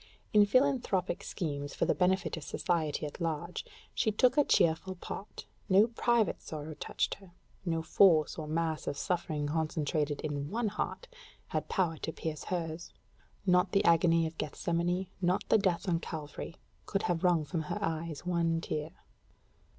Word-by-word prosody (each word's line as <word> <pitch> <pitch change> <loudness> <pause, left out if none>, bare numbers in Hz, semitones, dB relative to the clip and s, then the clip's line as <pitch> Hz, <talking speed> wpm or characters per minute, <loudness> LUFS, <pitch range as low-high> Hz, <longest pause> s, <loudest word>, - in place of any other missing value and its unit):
In 210 -1 +7
philanthropic 235 -7 +2
schemes, 145 -5 -4
for - - +1
the - - +3
benefit 190 +1 +1
of 160 - -7
society 155 -1 -1
at 150 - -7
large, 165 +1 -2 0.3
she 220 - +1
took 245 +4 +3
a 295 - +5
cheerful 170 -3 +2
part; 195 +3 -7 0.2
no 195 +3 +7
private 235 -2 +1
sorrow 155 0 -6
touched - - -2
her: 190 -3 -17 0.3
no 165 -2 0
force 160 -2 +5
or 155 -2 -5
mass 160 0 -1
of 140 - -2
suffering 155 -3 -1
concentrated 150 -1 -1
in 145 -1 -3
one 225 +1 0
heart 215 - -4 0.4
had - - -2
power 170 -5 +1
to 160 - -4
pierce 160 -1 -5
hers. 170 -2 -3 0.5
Not 180 0 +3
the 195 - +3
agony 165 0 +5
of 160 0 -6
Gethsemane, 170 +4 -1 0.2
not 180 +3 +1
the 220 - +6
death 185 -2 0
on 170 -2 +2
Calvary, 160 0 -6 0.3
could 195 - -1
have 175 0 0
wrung 175 -4 +3
from 165 +2 -2
her - - -1
eyes 165 -4 -3
one 170 -2 +1
tear. 155 -2 -3
170 Hz, 160 wpm, -31 LUFS, 155-190 Hz, 0.5 s, In